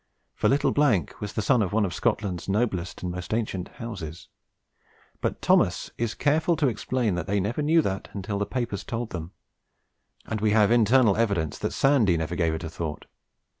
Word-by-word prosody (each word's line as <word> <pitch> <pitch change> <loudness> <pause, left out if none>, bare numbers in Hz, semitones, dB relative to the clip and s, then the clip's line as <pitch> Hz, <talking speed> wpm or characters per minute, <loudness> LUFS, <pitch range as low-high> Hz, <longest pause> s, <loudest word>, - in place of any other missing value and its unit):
For - - +1
'little 140 +2 +2 0.3
' 80 - -12
was 105 -1 -5
the 110 - -1
son 125 +1 +3
of 100 -2 -1
one 110 -1 +3
of 90 - -3
Scotland's 95 -1 -1
noblest 95 -5 -1
and 90 - -2
most 90 +4 -3
ancient 100 -6 -2
houses; 90 -9 -7 0.9
but - - -2
Thomas - - +2
is 115 -1 -2
careful 155 +4 +2
to 150 -2 +2
explain 120 -1 -1
that 90 - -3
they 100 +1 +1
never 110 +9 -1
knew 160 +2 +4
that 95 -4 -3
until 100 0 -3
the 100 - -1
papers 115 -6 -3
told 115 -1 -4
them, 85 -1 -6 0.9
and 110 -2 -3
we 105 -1 +2
have 105 0 +5
internal 120 -2 +4
evidence 100 -9 0
that - - -2
Sandy 125 -11 +3
never 80 +1 -3
gave 80 -2 +1
it 80 - -6
a 80 - -4
thought. 80 -3 -5
105 Hz, 190 wpm, -26 LUFS, 90-120 Hz, 0.9 s, have